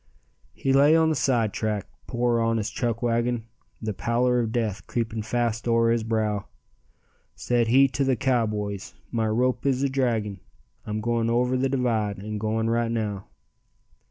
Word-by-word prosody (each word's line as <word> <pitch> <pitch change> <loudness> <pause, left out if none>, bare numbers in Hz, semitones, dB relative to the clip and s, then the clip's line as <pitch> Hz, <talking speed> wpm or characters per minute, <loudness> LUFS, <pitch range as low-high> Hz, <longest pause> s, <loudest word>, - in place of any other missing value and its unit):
He 135 - 0
lay 145 +3 +6
on 160 -1 +4
the 160 - +1
sidetrack, 110 -6 0 0.2
poor 120 -1 +1
honest 115 -2 0
Chuckwagon, 120 0 0 0.4
The 110 -1 -2
pallor 120 +4 +1
of 115 -2 -1
death 110 -4 -2
creeping 115 -2 -2
fast 115 +1 -1
o'er 115 0 +3
his 115 -1 +1
brow; 110 -4 -1 0.9
Said 120 -2 +1
he 135 +4 +6
to 140 - -1
the 130 -1 +2
cowboys, 105 -6 -1 0.2
"My 115 -2 0
rope 125 +3 +1
is 135 -1 +1
a 140 - +2
dragging, 115 -7 -1 0.5
I'm 105 0 -2
going 115 0 0
o'er 125 +2 +2
the 130 +1 +1
divide 115 -6 0
and 105 +2 -5
going 110 +1 0
right 115 0 +1
now. 105 -4 -3
115 Hz, 155 wpm, -25 LUFS, 110-125 Hz, 0.9 s, lay